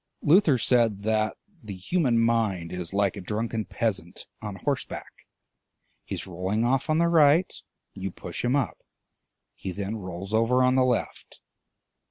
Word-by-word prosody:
Luther 160 -3 +5
said 115 -4 +2
that 110 0 0 0.2
the 105 -4 -7
human 125 - +1
mind 115 -7 +1
is 90 -2 -5
like 100 -1 +1
a 100 - -6
drunken 110 +3 -3
peasant 95 -8 -3 0.2
on 105 -2 -5
horseback: 135 +3 -5 0.8
he - - -4
is - - -6
rolling 95 +5 -1
off 130 +4 +1
on 155 - +3
the 170 +1 +3
right, 165 +1 +4 0.4
you 95 0 -4
push 85 -1 -7
him 125 +2 +2
up, 135 -6 -1 0.7
he 95 - -6
then 100 +4 -4
rolls 95 +1 -7
over 115 +3 +3
on 125 0 +4
the 130 0 +4
left. 125 -2 -2
110 Hz, 155 wpm, -26 LUFS, 95-130 Hz, 0.8 s, Luther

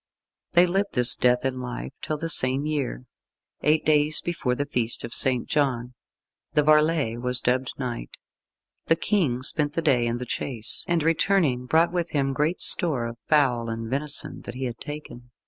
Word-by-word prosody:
They 175 +1 +6
lived 195 +3 -1
this 125 -1 +6
death 125 +1 +1
in 130 -1 -2
life 125 +1 -6
till 155 - -3
the 165 +2 -4
same 135 -2 0
year 145 -4 -3 0.6
eight 155 +1 +2
days 150 0 +2
before 150 -8 -2
the 145 - -2
Feast 120 -5 -1
of 120 - -6
St. 125 -3 +5
John 125 -4 -1 0.6
the 150 0 +3
varlet 150 -6 +2
was 125 0 +2
dubbed 125 +1 -1
knight. 120 - -5 0.8
The 165 - +4
King 160 - 0
spent 145 +1 -1
the 165 - -1
day 125 -6 +2
in 120 0 -1
the 125 - -6
chase, 120 -2 -3
and 170 -2 +1
returning, 160 -6 +1
brought 165 +5 +3
with 175 -1 -2
him 135 -2 0
great 150 +6 -1
store 145 -9 +3
of 115 0 -7
fowl 125 -6 +2
and 115 0 -5
venison 145 +2 -4
that 120 - -7
he 130 - -5
had 120 -2 -6
taken. 145 -5 -8
135 Hz, 180 wpm, -24 LUFS, 125-155 Hz, 0.8 s, They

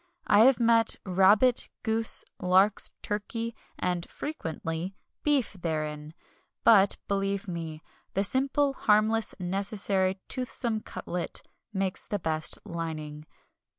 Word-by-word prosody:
I 215 +2 +6
have 265 -1 +5
met 230 -1 +4
rabbit, 200 +6 +4
goose, 225 -1 +2 0.2
larks, 190 +3 +3
turkey, 230 +3 -3 0.2
and 180 -1 -2
(frequently) 165 - -5 0.3
beef 285 -8 +2
therein; 155 -3 -4 0.5
but, 205 -3 +6
believe 195 0 -1
me, 165 -3 -6 0.3
the 195 - +2
simple, 275 +5 +2
harmless, 215 -1 +2
necessary, 195 0 -1
toothsome 240 -3 -1
cutlet 175 -4 -4 0.3
makes 190 -2 -2
the 205 - -1
best 155 -3 0
lining. 155 -2 -6
195 Hz, 105 wpm, -28 LUFS, 170-225 Hz, 0.5 s, I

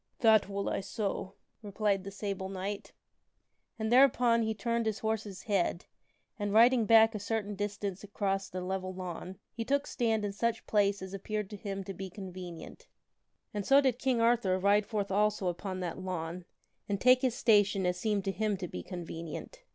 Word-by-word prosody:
" - - -45
That 220 -4 +5
will 200 0 -3
I - - 0
so," 195 -1 -3 0.3
replied 205 -2 0
the 195 - -6
Sable 195 -1 -4
Knight. 195 +1 -5 0.9
And 220 0 -2
thereupon 245 -2 +5
he 220 -1 -1
turned 230 +2 -1
his 215 -1 0
horse's 220 -3 -3
head 190 -4 0 0.5
and, 205 -1 -1
riding 230 +1 +5
back 225 0 +7
a 210 - -3
certain 210 0 -2
distance 205 -1 -4
across 195 -1 -2
the 185 - -5
level 185 0 -3
lawn, 185 0 -6 0.2
he 230 - -3
took 280 +4 +1
stand 225 -3 0
in 200 - -3
such 230 +2 -1
place 200 -2 +2
as 190 0 -8
appeared 210 +1 -4
to - - -5
him 195 -1 -5
to 195 - -6
be 190 0 -6
convenient. 185 -3 -9 0.7
And 205 -1 -2
so 275 +7 +6
did 260 -3 +1
King 255 -3 +1
Arthur 230 -5 +3
ride 200 +2 +3
forth 205 -2 -2
also 205 -1 +2
upon 185 +1 -4
that 175 0 -4
lawn, 180 -1 -4 0.4
and 200 -1 0
take 255 +2 +6
his 255 -3 +1
station 205 -6 +3
as 180 0 +1
seemed 210 -1 0
to 195 - +1
him 210 0 -1
to 180 -1 -5
be - - -6
convenient. 170 - -7
205 Hz, 185 wpm, -31 LUFS, 190-220 Hz, 0.9 s, back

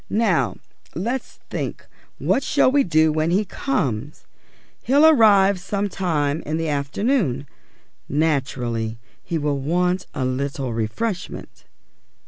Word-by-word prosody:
Now 175 - +1 0.4
let's 235 - -3 0.2
think - - -4 0.3
what - - +1
we - - -7
shall 280 -3 +3
do 160 - +3
when 155 +1 0
he 195 +5 +2
comes. 150 - -2 0.6
He'll 285 +5 +4
arrive 205 -10 +6
some 200 +2 -2
time 160 -6 -1
in 155 +1 -3
the 165 -1 -1
afternoon. 145 - 0 0.6
Naturally 130 -7 -1 0.3
he 170 - -2
will 145 -2 -1
want 180 +5 0
a 130 -4 -1
little 130 -1 -2
refreshment." 175 - -4
160 Hz, 115 wpm, -22 LUFS, 140-205 Hz, 0.6 s, arrive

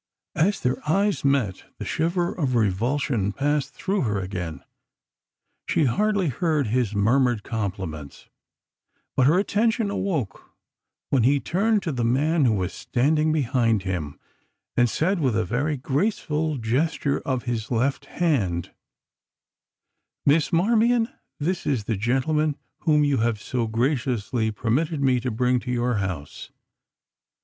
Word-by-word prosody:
As 195 +6 +1
their 125 0 0
eyes 200 +4 +1
met 135 -9 +1
the - - -6
shiver 175 +2 0
of 140 -8 -1
revulsion 115 +1 +1
passed 145 +4 -1
through 195 0 -1
her 105 -7 0
again. 90 -4 -5 1.0
She - - +2
hardly 200 - +1
heard 150 +1 0
his 115 -1 0
murmured 120 +2 +2
compliments, 95 - -5 0.9
but 130 - +4
her 160 +5 +4
attention 215 +2 +1
awoke 165 - -3 0.6
when 135 - +3
he 140 +5 +4
turned 205 +7 +1
to 165 - -2
the 125 -4 -2
man 145 +6 +2
who 115 - +4
was 95 -2 -2
standing 150 +5 +1
behind 120 -8 +1
him, 85 -7 -4 0.6
and 120 -1 +3
said 180 - 0
with 130 -7 +1
a - - +1
very 145 - -1
graceful 150 - -1
gesture 140 +5 0
of 130 -3 -2
his 115 -3 -3
left 130 +3 0
hand: 105 - -1 1.5
"Miss 150 +4 +3
Marmion, 225 +6 +3 0.3
this 175 +4 -2
is 130 -7 0
the 110 +1 -1
gentleman 140 +7 0 0.3
whom 150 -2 +4
you 145 -2 +2
have 115 -1 0
so 120 +1 -2
graciously 120 -1 0
permitted 130 +9 -1
me 130 -2 +3
to 125 +1 -2
bring 125 +2 +1
to 125 - -8
your 120 -1 0
house. 90 -7 -5
130 Hz, 135 wpm, -24 LUFS, 115-155 Hz, 1.5 s, but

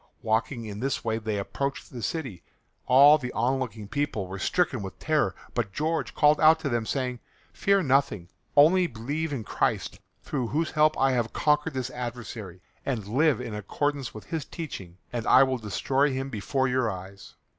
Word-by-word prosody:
Walking 115 +2 0
in 105 -1 -6
this 135 +2 -2
way 110 0 0
they 110 -2 -2
approached 140 +7 -4
the 120 - -6
city. 130 - -4 0.5
All 140 +4 +7
the 125 -3 -5
onlooking 120 -4 -1
people 145 -5 -2
were 95 +1 -7
stricken 135 - +1
with 95 -2 -7
terror, 155 -1 +1 0.2
but 110 -5 -2
George 160 +2 -1
called 150 0 +4
out 160 +1 +7
to 140 - -1
them 120 -3 -1
saying, 125 -3 -2 0.3
"Fear 200 -1 +2
nothing. 135 - +1 0.3
Only 175 +5 +6
believe 145 +6 -3
in 130 -6 -3
Christ, - - -1 0.2
through 130 -5 -2
whose 155 +6 -1
help 155 0 +3
I 135 0 +3
have 120 -3 -1
conquered 150 0 +1
this 130 0 -3
adversary, 120 -7 -7 0.2
and 120 -7 -2
live 135 +5 +2
in 120 -3 -5
accord 125 +8 -1 0.2
with 110 - -10
His 160 -3 -3
teachings, 100 - -8 0.2
and 120 -2 -3
I 130 - +7
will 130 -1 0
destroy 130 - +1
him 135 +1 -3
before 130 +5 0
your 125 -2 +1
eyes." 95 0 -9
130 Hz, 175 wpm, -27 LUFS, 110-145 Hz, 0.5 s, All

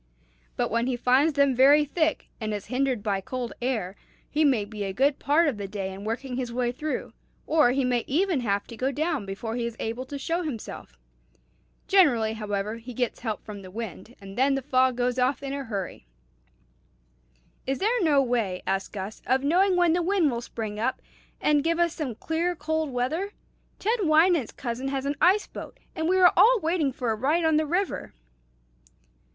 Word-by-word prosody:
But - - -1
when 230 +2 +1
he 255 -2 -1
finds 260 +6 +3
them 280 -1 +3
very 285 +4 +6
thick, 315 +2 -1
and 215 -2 -2
is 205 - -6
hindered 255 -4 0
by 200 -3 0
cold 245 +3 -5
air, 220 -7 -2 0.3
he 305 +2 +1
may 255 -8 +3
be 210 0 -6
a 195 -1 -3
good 275 +6 +2
part 310 +4 +3
of 265 -7 -1
the 200 -1 -5
day 195 -1 -4
in 195 +1 -9
working 245 +3 -3
his 250 -2 -3
way 240 0 0
through, 305 +4 -4 0.3
or 305 -5 +4
he 265 +1 +1
may 245 -2 +1
even 345 +2 +1
have 200 -4 -1
to 230 - -10
go 260 +4 -1
down 300 - -1
before 220 +4 -4
he 240 - -2
is 235 - -6
able 235 +4 -4
to 285 - -5
show 330 +5 -1
himself. 225 - -7 0.9
Generally, 245 - +4
however, 210 0 -3
he 235 +1 -10
gets 245 -1 -1
help 220 -4 -4
from 205 -2 -8
the 185 - -10
wind, 225 +2 -7
and 195 0 -10
then 270 +2 +3
the 270 - -3
fog 255 -1 +2
goes 250 0 0
off 255 +3 +1
in 275 0 -3
a 280 0 -3
hurry." 195 - -5 1.6
"Is 270 0 0
there 460 +5 +1
no 290 -5 +4
way," 230 -7 -1
asked 195 0 -2
Gus, 200 +1 -6
"of 260 +2 +2
knowing 365 +6 +3
when 350 -2 +4
the 350 - +1
wind 350 -4 +2
will 235 -1 -3
spring 215 -3 -5
up, 255 +4 -1 0.4
and 295 -1 +2
give 335 +1 +1
us 340 -1 +2
some 275 -8 -4
clear 335 +7 -1
cold 315 -1 -1
weather? 310 +11 -2 0.4
Ted 450 +4 0
Wynant's 320 - +4
cousin 245 +1 -4
has 270 0 -2
an 285 +1 -1
ice 390 +4 +4
boat, - - -10 0.2
and 320 -1 -1
we 375 - +3
are 360 -2 +6
all 485 +2 +6
waiting 320 -4 0
for 245 -2 -2
a - - 0
ride 300 +9 +1
on 320 -1 +4
the 310 0 +1
river." 360 - -2
260 Hz, 200 wpm, -26 LUFS, 225-315 Hz, 1.6 s, very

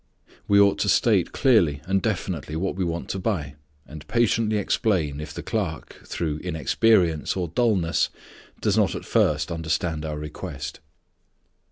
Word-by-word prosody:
We 100 0 +5
ought 100 -1 +4
to - - +1
state - - +3
clearly 85 - +3
and 95 +1 +1
definitely 90 -8 -3
what 95 +4 -1
we 95 - -1
want 85 0 -3
to 95 - -2
buy, 90 -9 -2 0.3
and 75 0 -11
patiently 115 -2 +2
explain 90 - 0
if 75 -1 -7
the - - -7
clerk, 95 -9 -4
through 80 -3 -3
inexperience 85 +1 +1
or 90 -3 -2
dulness, 95 -4 +1 0.5
does - - +2
not - - +2
at - - -6
first 75 +2 +1
understand 80 -1 -2
our 75 -1 -4
request. 75 0 -6
85 Hz, 150 wpm, -24 LUFS, 75-100 Hz, 0.5 s, We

